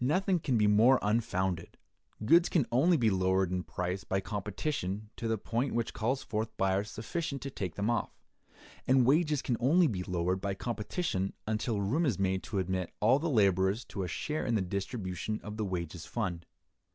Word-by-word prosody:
Nothing 185 +6 +2
can 130 -6 0
be 105 - +3
more 110 +6 +6
unfounded. 95 -5 -1 0.5
Goods 170 +8 +5
can 155 -8 +2
only 160 +8 +4
be 115 -5 +3
lowered 95 -1 +2
in 90 0 0
price 90 +1 -3
by 95 - -1
competition 105 0 -3
to 115 - -4
the 110 0 +1
point 115 +5 -2
which 120 -1 -1
calls 125 +5 -1
forth 110 +1 -2
buyers 95 +2 +1
sufficient 140 +5 -4
to 140 - -5
take 95 -8 -4
them 100 +1 -1
off; 120 -1 0 0.8
and 130 -1 +5
wages 150 +1 +3
can 120 - 0
only 160 +9 +4
be 100 - -1
lowered 90 +1 -1
by 100 -1 -2
competition 105 - -2
until 110 0 -1
room 145 - +1
is 115 -9 0
made 95 -1 0
to 105 - -5
admit 95 -1 -1
all 120 +6 +4
the 165 +2 -1
laborers 100 - +2
to 100 - -5
a 90 - -2
share 150 - -3
in 120 - 0
the 105 - +2
distribution 100 +1 -3
of 105 0 -7
the 110 - -1
wages 85 -3 -4
fund. 90 -8 -3
105 Hz, 190 wpm, -31 LUFS, 95-130 Hz, 0.8 s, more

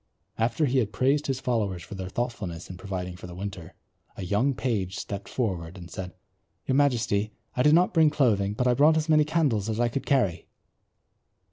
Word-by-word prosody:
After 115 +7 +1
he 135 -1 +2
had 110 -4 -1
praised 135 +8 +1
his 135 -2 -1
followers 105 -9 -1
for - - -10
their 95 -1 -5
thoughtfulness 95 -8 -4
in 90 - -9
providing 90 -2 -5
for 90 - -10
the 90 - -9
winter, 95 -3 -7 0.4
a 95 - -5
young 110 +9 +1
page 100 -8 -2
stepped 100 -1 -6
forward 90 -7 -3
and 85 -1 -10
said, 90 -2 -6 0.5
"Your - - 0
Majesty, 120 -7 +1 0.2
I 125 - +1
did 150 +3 +6
not 180 +2 +3
bring 160 -3 +5
clothing, 105 -9 +1
but 125 - 0
I 125 - +4
brought 150 +5 +5
as 160 0 -1
many 155 -1 +5
candles 145 -10 +1
as 110 0 -2
I 120 0 +2
could 135 +4 -4
carry." 125 -11 +1
110 Hz, 200 wpm, -27 LUFS, 95-135 Hz, 0.5 s, did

